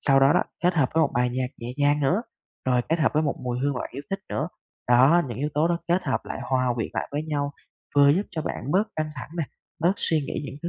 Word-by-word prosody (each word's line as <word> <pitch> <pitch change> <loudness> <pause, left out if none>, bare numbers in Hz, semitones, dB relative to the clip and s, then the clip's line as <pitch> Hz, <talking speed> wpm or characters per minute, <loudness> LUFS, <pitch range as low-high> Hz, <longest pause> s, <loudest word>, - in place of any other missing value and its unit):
sau 135 -1 +4
đó 135 +1 +6
đó, 180 - +3 0.2
kết 180 0 +4
hợp 145 -5 +3
với 165 - +4
một 155 - +3
bài 125 0 +2
nhạc 130 +1 -1
nhẹ 120 +1 -5
nhàng 145 0 +3
nữa, 175 +10 +2 0.4
rồi 125 -1 +3
kết 165 +1 +2
hợp 145 - +2
với 155 - +3
một 145 - 0
mùi 125 -1 -1
hương 140 0 +1
mà - - -3
bạn - - -5
yêu 140 - -6
thích 195 - -1
nữa. 155 +5 -2 0.4
Đó, 130 +8 +6
những 120 - -5
yếu 145 +3 0
tố 155 +3 +3
đó 170 -1 +1
kết 175 +2 +2
hợp 130 - 0
lại - - -5
hòa 130 -2 +1
quyện 115 -3 -2
lại - - -2
với 145 - -1
nhau, 145 -2 -2 0.4
vừa 140 -1 +7
giúp 165 +8 +4
cho 160 -4 -3
bạn 135 -3 -4
bớt 205 +4 +3
căng 155 -1 -1
thẳng 135 +1 -8
nè, 165 - +1 0.4
bớt 175 +3 +4
suy 160 -2 +1
nghĩ 140 - -4
những 140 - -6
thứ 170 - -2
145 Hz, 280 wpm, -25 LUFS, 130-160 Hz, 0.4 s, vừa